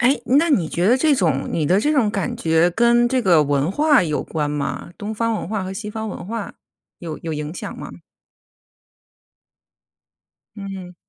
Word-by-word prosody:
哎， 255 Hz, +3 st, +3 dB, 0.2 s
那 330 Hz, +2 st, +2 dB
你 175 Hz, -, +2 dB
觉 175 Hz, +2 st, 0 dB
得 245 Hz, -, +5 dB
这 305 Hz, +2 st, +3 dB
种 160 Hz, -, 0 dB
你 160 Hz, -, -1 dB
的 185 Hz, +5 st, +3 dB
这 300 Hz, +5 st, +1 dB
种 235 Hz, -8 st, +2 dB
感 195 Hz, -3 st, -3 dB
觉 165 Hz, +1 st, +2 dB
跟 240 Hz, +5 st, +3 dB
这 255 Hz, -1 st, 0 dB
个 170 Hz, -6 st, +5 dB
文 145 Hz, +2 st, 0 dB
化 290 Hz, +3 st, +4 dB
有 155 Hz, -4 st, -1 dB
关 150 Hz, -2 st, -3 dB
吗？ 145 Hz, +3 st, -4 dB
东 210 Hz, +1 st, -5 dB
方 230 Hz, +1 st, 0 dB
文 200 Hz, -, -4 dB
化 210 Hz, -3 st, -2 dB
和 185 Hz, +1 st, -5 dB
西 210 Hz, +2 st, -6 dB
方 220 Hz, 0 st, -5 dB
文 190 Hz, -, -7 dB
化 225 Hz, 0 st, -5 dB, 0.4 s
有 165 Hz, -3 st, -6 dB
有 165 Hz, -, -5 dB
影 150 Hz, +2 st, -5 dB
响 -, -, -7 dB
吗？ -, -, -7 dB, 2.7 s
嗯。 195 Hz, -3 st, -8 dB
195 Hz, 195 characters per minute, -21 LUFS, 165-235 Hz, 2.7 s, 得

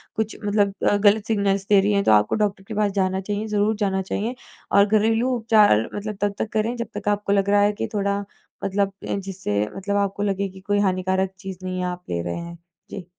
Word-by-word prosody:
कुछ 220 Hz, -1 st, -2 dB
मतलब 205 Hz, -1 st, +2 dB, 0.2 s
अ, -, -, +3 dB
गलत 205 Hz, +1 st, +3 dB
सिग्नल्स 200 Hz, -3 st, +1 dB
दे 205 Hz, -1 st, +6 dB
रही 205 Hz, +1 st, +1 dB
है, 200 Hz, 0 st, +2 dB
तो -, -, +3 dB
आपको 105 Hz, 0 st, +4 dB
डॉक्टर 205 Hz, -2 st, -1 dB
के 220 Hz, -, -6 dB
पास 205 Hz, -1 st, +1 dB
जाना 190 Hz, -1 st, 0 dB
चाहिए। 205 Hz, +2 st, -3 dB
ज़रूर 210 Hz, +1 st, +1 dB
जाना 195 Hz, -2 st, 0 dB
चाहिए 215 Hz, +5 st, -3 dB, 0.4 s
और 200 Hz, 0 st, +6 dB
घरेलू 225 Hz, +3 st, +2 dB
उपचार 215 Hz, -, +4 dB
मतलब 210 Hz, 0 st, -5 dB
तब 205 Hz, -1 st, +1 dB
तक 220 Hz, -, -1 dB
करें, 220 Hz, +2 st, 0 dB
जब 235 Hz, -, -3 dB
तक -, -, -7 dB
आपको 205 Hz, -1 st, 0 dB
लग 200 Hz, 0 st, +2 dB
रहा 205 Hz, 0 st, +4 dB
है 205 Hz, -, +4 dB
कि -, -, -3 dB
थोड़ा 200 Hz, -1 st, 0 dB, 0.4 s
मतलब 200 Hz, 0 st, 0 dB, 0.2 s
जिससे 190 Hz, -, -2 dB
मतलब 200 Hz, +1 st, -2 dB
आपको 200 Hz, 0 st, -1 dB
लगे 200 Hz, -1 st, 0 dB
की 190 Hz, -, -13 dB
कोई 205 Hz, +1 st, 0 dB
हानिकारक 190 Hz, -1 st, +1 dB
चीज़ 190 Hz, -1 st, -7 dB
नहीं 185 Hz, 0 st, -3 dB
आप 180 Hz, 0 st, -4 dB
ले 85 Hz, -1 st, -1 dB
रहे 85 Hz, 0 st, -3 dB
हैं। 170 Hz, 0 st, -7 dB, 0.3 s
जी। 195 Hz, -3 st, -7 dB
200 Hz, 220 wpm, -23 LUFS, 190-210 Hz, 0.4 s, दे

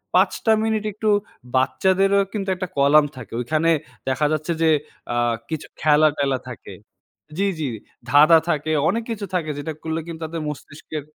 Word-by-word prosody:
৫ -, -, +5 dB
টা 225 Hz, -, +5 dB
মিনিট 220 Hz, -1 st, 0 dB
একটু 215 Hz, +1 st, -1 dB, 0.5 s
বাচ্চাদেরও 195 Hz, +8 st, +3 dB
কিন্তু 195 Hz, -2 st, -3 dB
একটা 185 Hz, 0 st, -4 dB
কলাম 145 Hz, +2 st, +5 dB
থাকে। 115 Hz, -2 st, -10 dB
ঐখানে 155 Hz, +6 st, +1 dB, 0.4 s
দেখা 140 Hz, +3 st, +1 dB
যাচ্ছে 155 Hz, +3 st, -1 dB
যে 160 Hz, -, +5 dB, 0.4 s
আ -, -, -2 dB, 0.3 s
কিছু 160 Hz, -1 st, -4 dB
খেলা-টেলা 150 Hz, -3 st, +3 dB
থাকে। 120 Hz, -, -9 dB, 0.6 s
জ্বি, 200 Hz, +1 st, +2 dB
জ্বি, 150 Hz, -, -1 dB, 0.4 s
ধাঁধা 155 Hz, +3 st, +7 dB
থাকে, 155 Hz, 0 st, 0 dB, 0.2 s
অনেক 230 Hz, +5 st, -1 dB
কিছু 210 Hz, -2 st, -4 dB
থাকে 155 Hz, -4 st, -1 dB
যেটা 160 Hz, +2 st, -4 dB
করলে 160 Hz, 0 st, -2 dB
কিন্তু 165 Hz, -1 st, -7 dB
তাদের 160 Hz, 0 st, -5 dB
মস্তিষ্কের 150 Hz, +1 st, -7 dB
160 Hz, 155 wpm, -22 LUFS, 150-190 Hz, 0.6 s, ধাঁধা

